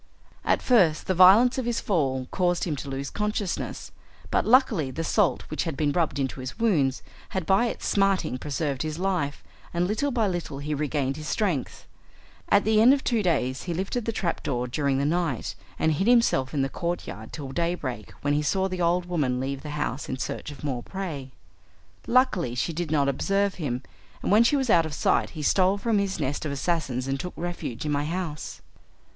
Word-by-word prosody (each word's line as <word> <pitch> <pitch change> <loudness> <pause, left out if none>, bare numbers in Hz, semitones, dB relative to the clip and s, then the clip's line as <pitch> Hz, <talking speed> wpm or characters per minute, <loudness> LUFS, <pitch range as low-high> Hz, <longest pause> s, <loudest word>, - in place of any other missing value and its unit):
At - - +1
first 185 -11 +4
the 185 - +1
violence 200 +9 +7
of 245 - -2
his 235 -1 0
fall 135 -9 0
caused 175 -2 +1
him 160 -4 -1
to 140 - -6
lose 135 0 -4
consciousness, 210 -2 -3 0.4
but - - +1
luckily 225 - +4
the 160 +5 -4
salt 195 +1 +2
which 155 - -2
had 160 -5 -3
been 145 -1 +1
rubbed 160 -4 0
into 135 -1 -2
his 130 0 -6
wounds 160 - +1 0.3
had 185 - -1
by 195 +7 +3
its - - -5
smarting 195 -9 +1
preserved 140 -1 -2
his 155 0 -3
life, 180 -6 -1 0.3
and 175 +1 +2
little 220 +9 0
by 235 -5 +1
little 175 -6 -3
he 145 +2 -3
regained 145 -2 -1
his 155 0 -6
strength. 180 - -1 0.6
At 205 - +5
the 215 0 +4
end 255 +5 +7
of 275 - -5
two 235 -3 +1
days 135 -8 0
he 175 -2 -2
lifted 195 +6 -2
the 230 - 0
trapdoor 145 - -2
during 135 +2 0
the 140 - +1
night 165 -5 -1 0.2
and 160 - +2
hid 175 +7 0
himself 230 - +3
in 140 -3 0
the - - +1
courtyard 135 - -5
till 140 -4 -6
daybreak, 150 -8 -2
when 145 0 +2
he 145 - +2
saw 190 +5 +1
the 185 -1 -4
old 175 +1 +2
woman 145 -8 0
leave 135 +1 -3
the 150 - -7
house 145 -2 -3
in 130 - -2
search 130 - -4
of 145 - -10
more 130 -4 -2
prey. 160 -6 -5 0.8
Luckily 210 - +2
she 165 +6 -1
did 170 0 -3
not 145 -3 +2
observe 195 +8 +1
him, 130 -3 -2 0.4
and - - 0
when 215 +3 +7
she 235 - +3
was 265 -5 +1
out 165 -2 +5
of 150 - -6
sight - - +2
he 150 - -4
stole 190 +5 +3
from 220 +1 +1
this 195 -2 -1
nest 145 -1 -2
of 155 - -3
assassins 140 -4 -1
and 135 0 -1
took 180 - -5
refuge 170 -8 -4
in 150 - -1
my 145 0 0
house. 165 -2 -4
165 Hz, 205 wpm, -26 LUFS, 140-195 Hz, 0.8 s, violence